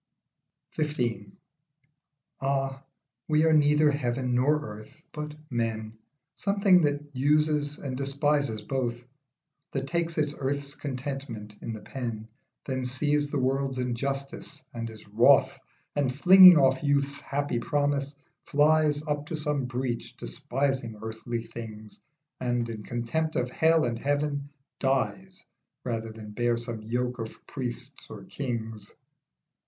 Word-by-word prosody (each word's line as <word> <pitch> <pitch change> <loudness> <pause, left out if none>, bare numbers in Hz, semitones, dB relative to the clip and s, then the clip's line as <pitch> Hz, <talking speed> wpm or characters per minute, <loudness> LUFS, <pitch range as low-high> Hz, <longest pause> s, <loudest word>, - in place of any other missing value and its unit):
XV. 120 -9 -1 1.1
AH, 135 0 -1 0.5
we 155 0 +3
are 160 - +5
neither 150 0 +5
heaven 125 -2 -1
nor 140 +5 +3
earth, 120 +9 -10
but 150 0 -6 0.2
men; 110 -2 -2 0.4
Something 200 -2 +4
that 145 -1 0
uses 150 +1 +2
and 135 -2 -5
despises 140 -4 0
both, 120 -1 -2 0.7
That 135 -1 -1
takes 170 +2 -1
its 150 -1 +1
earth's 140 +1 -2
contentment 130 -6 -5
in - - -4
the 110 - -8
pen, 115 -5 -5 0.4
Then 130 -1 -2
sees 145 +3 0
the 145 - -1
world's 135 0 0
injustice 135 +4 -3
and 115 -1 -4
is 110 -1 -12
wroth, - - +5 0.4
And 140 -3 +1
flinging 180 +5 +9
off 135 -2 +4
youth's 140 -1 +1
happy 140 -3 -1
promise, 145 0 0 0.3
flies 150 0 +3
Up 150 -1 -2
to 165 - -3
some 150 -3 -1
breach, 125 -1 -3
despising 125 - -2
earthly 115 +1 -4
things, 110 -2 -9 0.4
And, 120 -1 0
in 110 -2 -5
contempt 120 +9 -2
of 125 - 0
hell 160 +2 +4
and 115 -1 -2
heaven, 145 +1 -1 0.3
dies 185 +8 -1 0.4
Rather 115 -2 -3
than 110 -1 -9
bear 120 +2 +1
some 115 -1 -4
yoke 125 +3 -2
of 110 -1 -7
priests 125 -4 -6
or - - -9
kings. 115 -6 -5
135 Hz, 125 wpm, -28 LUFS, 120-145 Hz, 1.1 s, flinging